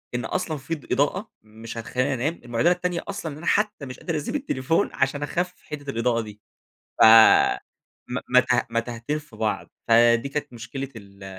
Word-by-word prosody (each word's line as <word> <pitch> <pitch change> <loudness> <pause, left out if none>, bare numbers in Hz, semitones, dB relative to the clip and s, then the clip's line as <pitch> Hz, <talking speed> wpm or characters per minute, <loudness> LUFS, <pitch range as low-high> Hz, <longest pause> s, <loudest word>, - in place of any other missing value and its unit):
إن 125 - -2
أصلًا 165 -4 -2
في 140 +4 -4
ض 145 - -14
إضاءة 185 +10 0
مش 110 +2 -10
هتخليني 125 +4 -1
أنام، 140 +7 -2
المعضلة 120 +9 +2
التانية 180 -1 -1
أصلًا 165 -7 -5
أنا 170 - -10
حتى 210 -6 +1
مش 130 -1 -9
قادر 165 -3 -3
أسيب 150 - -4
التليفون 165 - 0
عشان 140 +2 0
أخفف 180 +4 -3
حِدِّة 145 -2 -6
الإضاءة 115 -1 0
دي. 105 -1 -11 0.6
ف - - +9 1.1
م - - -2 0.2
متاه - - +3
متاهتين 115 +5 -2
في 150 -6 -16
بعض، 110 -1 -2 0.2
فدي 115 +2 +4
كانت 140 -3 -4
مشكلة 125 +4 -6
ال 100 -2 -13
135 Hz, 170 wpm, -24 LUFS, 115-160 Hz, 1.1 s, ف